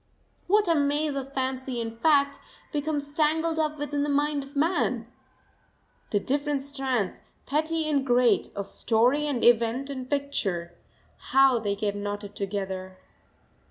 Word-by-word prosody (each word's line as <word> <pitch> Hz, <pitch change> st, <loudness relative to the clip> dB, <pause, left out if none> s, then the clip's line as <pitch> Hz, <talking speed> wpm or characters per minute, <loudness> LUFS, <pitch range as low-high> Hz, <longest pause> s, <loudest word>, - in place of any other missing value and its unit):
What 415 Hz, +1 st, +4 dB
a 335 Hz, -, +4 dB
maze 295 Hz, 0 st, +1 dB
of 275 Hz, -1 st, -5 dB
fancy 260 Hz, -2 st, -2 dB
and 225 Hz, -1 st, -4 dB
fact 280 Hz, +2 st, +3 dB, 0.3 s
becomes 290 Hz, -1 st, -2 dB
tangled 320 Hz, +1 st, +1 dB
up 305 Hz, -1 st, 0 dB
within 290 Hz, 0 st, -2 dB
the 295 Hz, -, 0 dB
mind 290 Hz, 0 st, +1 dB
of 275 Hz, +2 st, -14 dB
man! 285 Hz, -6 st, +1 dB, 1.0 s
The 205 Hz, -, +1 dB
different 280 Hz, +4 st, -1 dB
strands 265 Hz, -7 st, -2 dB, 0.2 s
petty 315 Hz, +2 st, 0 dB
and 285 Hz, -3 st, +1 dB
great 245 Hz, -4 st, +3 dB
of 200 Hz, -1 st, -4 dB
story 250 Hz, +7 st, +2 dB
and 265 Hz, -5 st, -1 dB
event 240 Hz, +3 st, +3 dB
and 260 Hz, -2 st, -6 dB
picture, 195 Hz, -12 st, -2 dB, 0.4 s
how 270 Hz, -2 st, +4 dB
they 205 Hz, -2 st, -1 dB
get 205 Hz, 0 st, -2 dB
knotted 205 Hz, 0 st, -5 dB
together! 190 Hz, -2 st, -4 dB
275 Hz, 140 wpm, -27 LUFS, 225-295 Hz, 1.0 s, What